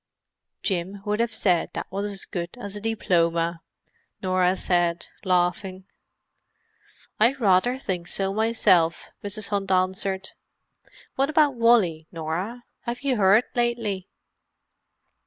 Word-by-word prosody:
"Jim 190 +1 -2
would 210 +1 -1
have 235 0 +1
said 180 -6 +2
that - - -4
was 200 +2 -2
as 195 - -4
good 175 +2 -5
as 205 -3 -6
a 205 - -6
diploma," 170 -6 +1 0.6
Norah 185 -1 +2
said, 175 -2 +1 0.2
laughing. 185 0 0 1.3
"I 230 +5 +5
rather 240 0 +2
think 180 -9 -4
so, 195 +1 -1
myself," 200 -7 +2
Mrs. 205 +1 -2
Hunt 200 -2 -1
answered. 190 +1 0 0.9
"What 275 +2 +2
about 300 -2 +4
Wally, 220 -10 +3
Norah? 175 +9 -4 0.2
Have 240 0 -4
you 270 -3 0
heard 200 +3 +5
lately?" 230 -6 -1
195 Hz, 120 wpm, -25 LUFS, 180-225 Hz, 1.3 s, I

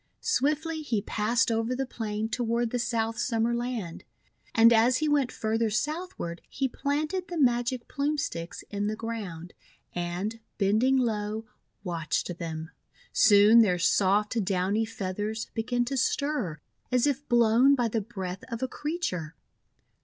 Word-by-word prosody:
Swiftly 315 - 0
he 230 -9 -1
passed 230 +3 +1
over 225 +2 0
the 270 +1 -1
plain 220 -3 -3
toward 235 0 -1
the 245 - -1
South 230 -1 -1
Summer 230 -1 +1
Land. 235 -7 -3 0.5
And 230 +1 +7
as 235 +3 +4
he 310 - 0
went 285 -4 +2
farther 225 +1 0
southward, 295 - -3
he 270 - -1
planted 305 +8 -2
the 350 - -5
Magic 245 -2 +1
Plume 295 +1 -1
Sticks 170 - -4
in 205 0 -1
the 215 - -1
ground, 200 -7 -6 0.4
and, 175 +6 -3 0.2
bending 220 +7 +3
low, 220 -2 -1 0.4
watched 170 -1 -2
them. 160 -1 -5 0.4
Soon 210 +2 +7
their 185 -5 +3
soft, 205 +5 +2
downy 195 +3 +1
feathers 210 +1 -4
began 245 +2 0
to 270 +2 -2
stir 255 - 0 0.3
as 250 0 +3
if 285 0 -1
blown 240 +3 +5
by 245 -3 +1
the 225 0 -1
breath 195 -4 -6
of 230 +2 -3
a - - +1
creature. 250 - -3
225 Hz, 145 wpm, -28 LUFS, 205-255 Hz, 0.5 s, And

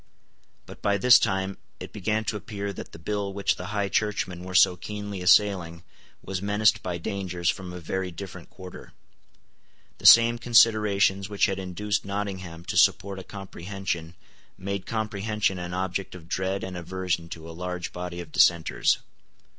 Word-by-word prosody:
But - - -13
by 100 0 +2
this 125 +4 +7
time 95 -2 -1 0.2
it - - -9
began 105 +2 -1
to 110 - -2
appear 100 -1 -5
that - - -9
the - - -11
bill 100 +4 -3
which 100 0 0
the - - -7
High 105 -1 -1
Churchmen 100 -4 -1
were 90 0 -7
so 90 - +6
keenly 105 +1 -6
assailing 90 -2 +3 0.4
was 95 -1 -4
menaced 105 +1 +2
by 90 -2 -3
dangers 90 -1 -2
from 95 -1 -8
a 90 - -7
very 95 +3 -3
different 90 +1 -9
quarter. 90 -1 -11 1.1
The - - +3
same 115 0 +8
considerations 105 -4 +4
which 100 -1 +2
had 95 -1 -2
induced 100 +3 -2
Nottingham 95 -4 -5
to 90 - -3
support 95 +2 +3
a - - -8
comprehension 95 -3 -6 0.4
made 100 0 -4
comprehension 105 -3 -1
an 90 0 -5
object 95 0 -3
of 85 -3 -12
dread 95 +2 -2
and 95 -1 -5
aversion 90 -1 -3
to 80 -1 -8
a - - -8
large 90 +1 -5
body 90 0 -5
of 80 -3 -11
dissenters. 85 0 +3
95 Hz, 160 wpm, -26 LUFS, 90-100 Hz, 1.1 s, same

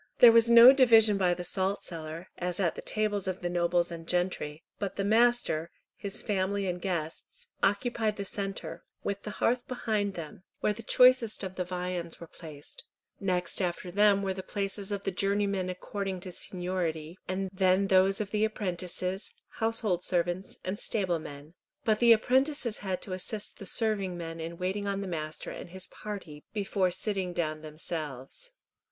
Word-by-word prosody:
There 240 - +10
was 230 0 +5
no 235 +2 +10
division 225 -6 +6
by 180 -2 +3
the 180 - -5
salt 190 +3 0
cellar, 165 +1 -6
as 180 0 -2
at 175 -4 +2
the - - -7
tables 205 -2 -1
of 185 0 -3
the 175 -1 -2
nobles 175 0 +1
and 165 -1 -7
gentry, 175 -4 -1 0.2
but 200 -2 -3
the 200 - -1
master, 220 -7 +3 0.3
his 200 -1 -4
family 200 -1 0
and 180 -1 -3
guests, 170 -4 -4
occupied 215 +2 +1
the 200 - -4
centre, 195 0 -4 0.2
with 200 0 -2
the - - -6
hearth 245 +5 +1
behind 215 -5 -1
them, 165 0 -7 0.2
where 210 - +1
the 220 - -8
choicest 250 -2 +4
of 190 -1 -4
the 185 - -2
viands 180 -1 -4
were 170 - -8
placed; 160 - -11 0.4
next 185 -1 -1
after 180 0 -2
them 200 +1 +4
were 190 -1 0
the 190 - -5
places 200 +1 -2
of 200 -1 -2
the 195 - -1
journeymen 200 -1 0
according 190 +1 -4
to 185 - -6
seniority, 175 -2 -3 0.3
then 190 0 +3
those 195 0 +4
of 205 -2 -3
the 215 0 +1
apprentices, 185 -2 -2 0.3
household 220 -5 +1
servants, 175 +1 -1
and 190 +3 -3
stable 185 -6 0
men, 145 0 -10 0.3
but 215 -1 +3
the 235 -1 +6
apprentices 260 +1 +2
had 190 -2 -3
to 190 - -4
assist 205 +3 -4
the 195 - -7
serving 200 -5 0
men 165 -1 -6
in 165 +1 -5
waiting 190 +3 -2
on 200 0 -1
the 195 - -4
master 155 -3 -4
and - - -8
his 185 +1 -6
party 180 -8 -8
before 195 -3 +1
sitting 190 -1 -2
down 155 -3 -2
themselves. 155 - -6
190 Hz, 170 wpm, -29 LUFS, 175-210 Hz, 0.4 s, There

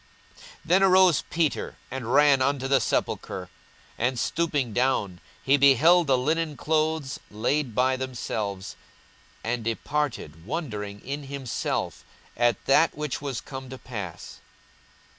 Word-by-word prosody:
42:024:012 - - -23 0.3
Then 180 +4 +4
arose 185 -5 +5
Peter, 160 -2 -1 0.2
and 125 -3 -4
ran 140 -1 +5
unto 135 0 +1
the 135 0 +4
sepulchre; 95 -4 -2 0.5
and 125 +2 0
stooping 145 -4 -1
down, 115 -8 0 0.2
he 140 +1 +4
beheld 145 +5 +5
the 130 -2 +4
linen 155 +3 -1
clothes 155 -1 0
laid 120 +3 -1
by 130 +1 +3
themselves, 110 -7 -4 0.7
and 115 +1 -2
departed, 115 - -3
wondering 105 - -5
in 140 +2 -5
himself 135 -3 -3 0.3
at 120 -2 +1
that 150 +4 +4
which 150 -3 -3
was 140 -4 -4
come 130 -2 -8
to 130 - -7
pass. 105 -10 -8
130 Hz, 125 wpm, -26 LUFS, 115-150 Hz, 0.7 s, arose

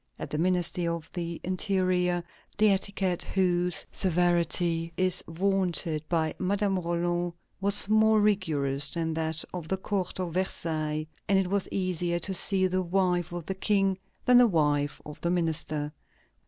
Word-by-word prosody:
At - - -7
the 150 - -2
Ministry 175 0 +1
of 170 -1 -4
the 170 -2 -4
Interior, 185 -2 0 0.3
the 215 0 +5
etiquette 190 -2 0
whose 180 -2 +1
"severity" 170 -1 +1
is 185 -1 +3
vaunted 175 -3 0
by 160 -2 0
Madame 195 0 0
Roland 175 0 -1 0.3
was 200 +1 +5
more 220 0 +4
rigorous 155 -9 +1
than 165 -1 -2
that 160 0 -2
of 175 -3 -6
the 190 - -1
court 190 -1 -3
of 175 -3 -3
Versailles, 155 -4 -2 0.2
and 195 - +4
it 190 -2 +1
was 200 -1 0
easier 180 -2 -1
to 190 +3 -4
see 190 +1 +1
the 185 0 0
wife 180 -1 0
of 175 -2 -6
the 190 - -2
King 195 0 +1 0.3
than 250 0 +6
the 245 - +6
wife 145 -6 0
of 150 - -10
the 170 - -1
minister. 155 -3 -1
180 Hz, 155 wpm, -28 LUFS, 165-190 Hz, 0.3 s, than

